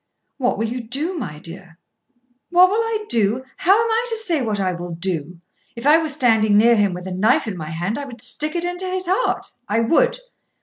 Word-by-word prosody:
"What 255 -3 0
will 225 - -1
you 245 +2 -4
do, 280 +11 -3
my 235 - -5
dear?" 170 +1 -11 0.7
"What 360 +1 +6
will 430 - +1
I 450 -2 -2
do? 225 - +1
How 375 - +4
am 455 +2 +2
I 455 +2 +1
to 455 - 0
say 350 -9 0
what 215 -4 -2
I 185 -2 0
will 175 -1 -6
do? 170 -1 -3 0.4
If 235 +2 -8
I 305 +3 +6
were 320 -1 -2
standing 225 -7 +3
near 235 +2 +5
him 200 -4 +1
with 180 0 -8
a 190 - -5
knife 210 +7 +2
in 210 - -4
my 155 -3 -7
hand 175 - -3
I 285 - -5
would 245 -3 -11
stick 300 +7 0
it 345 0 -1
into 355 +1 -3
his 370 0 -2
heart. 380 +7 0 0.2
I 220 +2 +1
would! - - +2
240 Hz, 225 wpm, -20 LUFS, -, 0.7 s, What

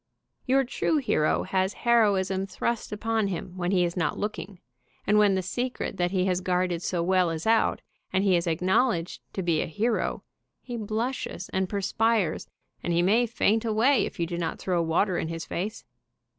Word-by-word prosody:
Your 270 +1 +4
true 270 +5 0
hero 230 - +1
has 190 +1 0
heroism 195 -5 +3
thrust 235 +3 -2
upon 220 0 0
him 180 -1 -5
when 180 -1 -2
he 185 -2 +3
is 170 - -3
not 165 -4 -1
looking, 205 -2 -5 0.5
and 210 +1 +4
when 205 -2 +4
the 190 - -1
secret 245 +2 -3
that 175 0 +1
he 185 0 0
has 185 -1 0
guarded 180 -2 0
so 175 -1 -1
well 185 -1 +3
is 165 -1 -4
out, 225 0 +2 0.3
and 190 +1 +1
he 195 -2 +4
is 170 0 0
acknowledged 180 +2 +1
'to 190 - -3
be 165 -3 +1
a - - -2
hero, 220 +7 -1 0.4
he 245 - -6
blushes 220 -3 -3
and 190 -1 -1
perspires, 205 -2 0 0.3
and 175 - -1
he 170 +1 +3
may 225 +6 +3
faint 225 -1 +1
away 230 +5 +3
if - - -6
you 170 - +1
do 170 0 -4
not 165 -1 -2
throw 180 -2 0
water 170 +3 +1
in - - -2
his 165 0 -5
face. 205 +6 -4
190 Hz, 185 wpm, -27 LUFS, 175-220 Hz, 0.5 s, Your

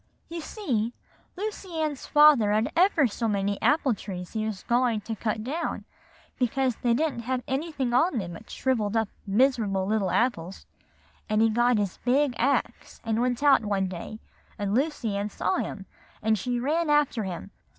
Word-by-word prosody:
"You 335 0 -5
see, 245 - -2 0.4
Lucy 385 -4 -5
Ann's 300 -3 -2
father 295 -8 +6
had 215 +2 +1
ever 340 -4 +4
so 230 0 -1
many 200 -1 -1
apple 295 -4 +3
trees 180 -4 -7
he 220 -1 -1
was 210 -3 -5
going 240 -2 +1
to 225 +2 -5
cut 215 +1 -2
down, 300 +8 -3 0.5
because 255 0 +1
they 235 -1 +1
didn't 305 -2 0
have 250 +2 -2
anything 270 -3 -2
on 270 +3 +3
them 175 -5 -4
but 215 +7 -12
shrivelled 230 -5 0
up 220 -2 0 0.2
miserable 210 -3 +2
little 205 -2 0
apples; 190 -3 -1 0.6
and 215 0 +2
he 225 0 +4
got 240 +1 +3
his 200 -3 -2
big 265 +2 +2
axe, 275 +4 -1
and 225 0 0
went 250 +2 0
out 280 -5 +5
one 200 -2 0
day, 185 +4 -7 0.4
and 205 -2 -2
Lucy 255 -5 0
Ann 200 +1 -2
saw 190 - -1
him, 195 -3 -4 0.4
and 220 0 +3
she 245 +4 -2
ran 310 +6 0
after 295 -6 +2
him. 185 +1 -6
235 Hz, 170 wpm, -26 LUFS, 210-275 Hz, 0.6 s, father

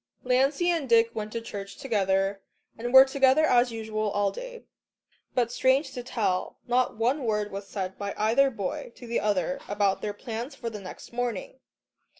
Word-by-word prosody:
Lancey 275 +7 +2
and 320 -6 -2
Dick 230 0 +5
went 215 -1 -4
to 230 - -3
church 200 -3 -7
together 195 -5 0 0.3
and 240 +2 -4
were 265 +1 +10
together 270 +2 +4
as 245 -3 +4
usual 215 -1 -2
all 205 0 +1
day. - - -8 0.7
But 240 -2 +1
strange 265 +4 +2
to 250 - -5
tell, 215 -7 -1
not 245 -1 +1
one 255 +6 +1
word 210 -2 -1
was 195 0 -6
said 190 -2 -5
by 200 0 -4
either 230 +6 +3
boy 245 +3 -5
to 245 - -11
the 235 0 -1
other 210 +5 0
about 200 -2 +1
their 210 - -3
plans 235 +5 -6
for 235 -3 -5
the 210 -2 -7
next 185 +4 -10
morning. 245 - -3
230 Hz, 175 wpm, -27 LUFS, 205-265 Hz, 0.7 s, were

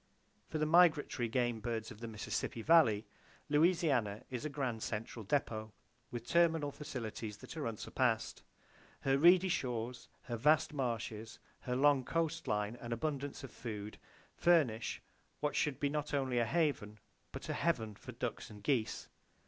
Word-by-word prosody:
For 155 - -3
the 155 - +1
migratory 155 -6 +4
game 120 -1 0
birds 110 +1 -3
of 110 - -11
the 115 - -5
Mississippi 110 +1 -3
Valley, 115 -10 +5 0.4
Louisiana 145 - +2
is 125 +2 -4
a - - -1
grand 130 -6 -2
central 115 +1 -4
depot, 110 -2 -1 0.4
with 120 -1 -6
terminal 165 -4 +3
facilities 115 -8 -5
that - - -10
are 150 -6 -2
unsurpassed. 115 +1 -1 0.6
Her 135 0 +2
reedy 180 +4 +7
shores, 125 -6 -2
her 120 -2 -4
vast 150 +5 +3
marshes, 115 -4 -3 0.2
her 125 -1 -3
long 140 0 +4
coast 165 +3 -1
line 105 +2 -1
and 120 - -6
abundance 140 +3 -3
of 135 - -8
food 105 -3 -6 0.3
furnish 145 -10 +2 0.4
what 150 0 -1
should 150 -4 0
be 145 - +2
not 150 0 -2
only 130 -3 +1
a 120 - +3
haven 140 -9 0 0.3
but - - -7
a - - -1
heaven 115 -11 0
for - - -10
ducks - - -4
and 105 -1 -12
geese. 120 -3 0
125 Hz, 155 wpm, -35 LUFS, 110-150 Hz, 0.6 s, reedy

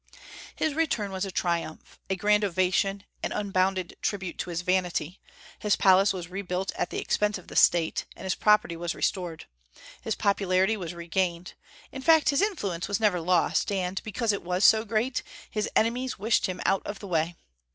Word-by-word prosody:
His 315 - 0
return 280 -10 0
was 190 +1 -2
a 195 - -5
triumph, 170 -3 -3
a 190 - +1
grand 210 +2 +2
ovation, 195 +1 +1 0.2
an - - -2
unbounded 190 -3 0
tribute 195 -4 -3
to - - -3
his 170 0 -3
vanity. 180 -1 -1 0.4
His 210 -1 +2
palace 195 +1 +5
was 180 -3 -5
rebuilt 185 0 -3
at 175 - -2
the - - -5
expense 210 0 0
of 185 - -14
the - - -10
State, 170 -2 +3
and - - -11
his 190 -1 0
property 210 -5 +3
was 170 0 -3
restored. 175 -4 -2 0.6
His 220 - -2
popularity 195 0 +2
was 175 -4 -6
regained. 170 0 -2 0.4
In 265 - -7
fact, 320 +2 +5
his 280 - +2
influence 205 - -1
was 200 +1 -1
never 205 -5 +2
lost; 180 +3 +1
and, 190 -1 -2
because 220 +1 -1
it 200 - -3
was 180 +3 0
so 220 0 +6
great, 230 +3 0 0.3
his 215 -1 -1
enemies 245 +3 +1
wished 215 +3 +1
him 185 -1 -5
out 195 - +2
of 205 - -5
the 200 - -9
way. 165 -1 0
190 Hz, 185 wpm, -27 LUFS, 180-210 Hz, 0.6 s, so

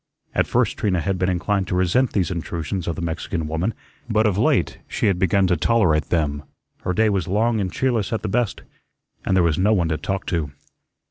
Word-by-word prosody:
At - - +1
first - - +1
Trina 95 -4 +1
had 95 +3 -1
been 90 0 +1
inclined 95 +2 0
to - - -1
resent 95 +8 +2
these 95 -4 +1
intrusions 85 +1 -4
of 85 - -1
the 90 - -5
Mexican 80 0 -3
woman, 80 +7 -1 0.4
but 110 -1 +2
of 105 -4 +2
late 100 - +1
she - - -2
had 95 -3 +2
begun 95 +1 +3
to 90 -1 +2
tolerate 85 -5 +2
them. 75 -4 0 0.4
Her 90 - -1
day 110 +3 +3
was 95 -3 0
long 110 +3 +1
and 95 -2 -2
cheerless 120 -5 0
at 115 - -2
the - - -1
best, 115 +2 -1 0.6
and 95 - +1
there 90 - +4
was 80 -1 +1
no 105 +4 +4
one 85 -6 +1
to 80 - 0
talk 95 +3 -3
to. 80 -4 0
95 Hz, 215 wpm, -22 LUFS, 85-105 Hz, 0.6 s, there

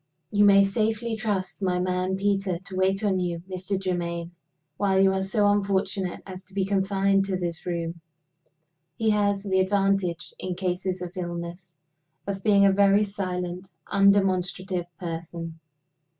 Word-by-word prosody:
"You 205 0 +4
may 200 -1 +7
safely 220 +3 0
trust 205 -4 -2
my 180 -2 +1
man 185 +1 0
Peter 195 -2 0
to 190 +2 -9
wait 190 +2 +1
on 195 -3 +2
you, 170 -2 -2
Mr. 185 +1 -3
Germaine, 170 -2 -3 0.5
while 195 -2 +2
you 195 0 +5
are 190 - 0
so 205 +2 +2
unfortunate 195 -2 -1
as 185 -1 -9
to 195 - -15
be 195 -1 +1
confined 195 0 +2
to 190 -1 -1
this 175 -1 -4
room. 170 -1 -3 0.9
He 220 -1 +1
has 205 -1 +1
the 190 -2 +1
advantage 195 -2 +1
(in 185 -1 -3
cases 185 0 -2
of 180 +1 -7
illness) 175 0 -6 0.5
of 195 -1 -4
being 200 -2 +5
a 195 - +6
very 200 +1 +4
silent, 185 -2 -4 0.2
undemonstrative 190 -2 +2
person. 165 -1 -6
190 Hz, 150 wpm, -26 LUFS, 180-200 Hz, 0.9 s, may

